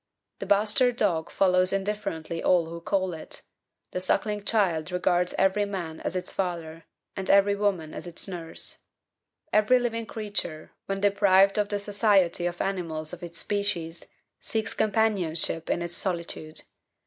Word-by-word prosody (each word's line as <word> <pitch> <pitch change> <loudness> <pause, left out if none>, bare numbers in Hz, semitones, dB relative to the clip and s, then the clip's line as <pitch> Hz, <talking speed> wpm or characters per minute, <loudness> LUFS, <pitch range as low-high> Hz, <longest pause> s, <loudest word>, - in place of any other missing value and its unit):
The - - -5
bastard 215 +5 +3
dog 170 -7 +1
follows 185 -1 +3
indifferently 195 -5 -3
all 175 -2 +3
who 170 +1 -7
call 185 0 0
it; 160 - -7 0.5
the - - -2
suckling 205 +3 0
child 185 -6 +1
regards 180 0 +1
every 195 +2 +3
man 175 -6 -5
as - - -3
its 180 - -3
father 165 -3 -3 0.3
and 190 0 -4
every 200 +1 +5
woman 195 -6 -1
as - - -6
its 175 - -1
nurse; 170 -3 -5 0.7
every 215 +4 +5
living 230 -2 -2
creature, 205 -8 -3 0.2
when 195 0 -2
deprived 200 0 +4
of 205 -1 +1
the 205 - 0
society 200 -4 +2
of 175 0 -4
animals 165 -5 -3
of - - -8
its 170 -1 -7
species, 175 -5 -2 0.3
seeks 220 -1 -2
companionship 195 -7 +1
in 175 - 0
its 175 0 -5
solitude. 170 -4 -4
190 Hz, 150 wpm, -27 LUFS, 170-205 Hz, 0.7 s, every